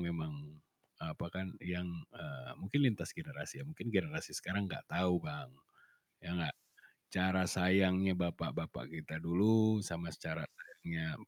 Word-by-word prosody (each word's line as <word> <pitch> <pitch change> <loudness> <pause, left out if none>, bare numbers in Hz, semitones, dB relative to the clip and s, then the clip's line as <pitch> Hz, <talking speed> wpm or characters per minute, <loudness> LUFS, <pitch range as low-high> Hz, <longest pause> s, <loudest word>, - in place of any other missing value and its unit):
memang, 85 -3 -1 0.7
apa - - -3
kan, 95 +2 -3
yang, 90 0 -2 0.3
eee, 65 -2 -7
mungkin 125 +10 +1
lintas 110 - -1
generasi 150 -4 -7
ya, - - -6
mungkin 140 -7 -5
generasi 90 -7 0
sekarang 100 +2 0
nggak 95 - -5
tahu, 90 -1 +3
Bang, 75 -4 -6 0.7
ya - - -7
nggak, 85 -2 0 0.6
cara 95 0 +4
sayangnya 95 +1 +5
bapak-bapak 85 -7 -2
kita 80 0 -5
dulu 110 +5 +6
sama 85 -1 -3
cara - - -3
sayangnya 80 -1 -4
90 Hz, 135 wpm, -37 LUFS, 85-95 Hz, 0.7 s, dulu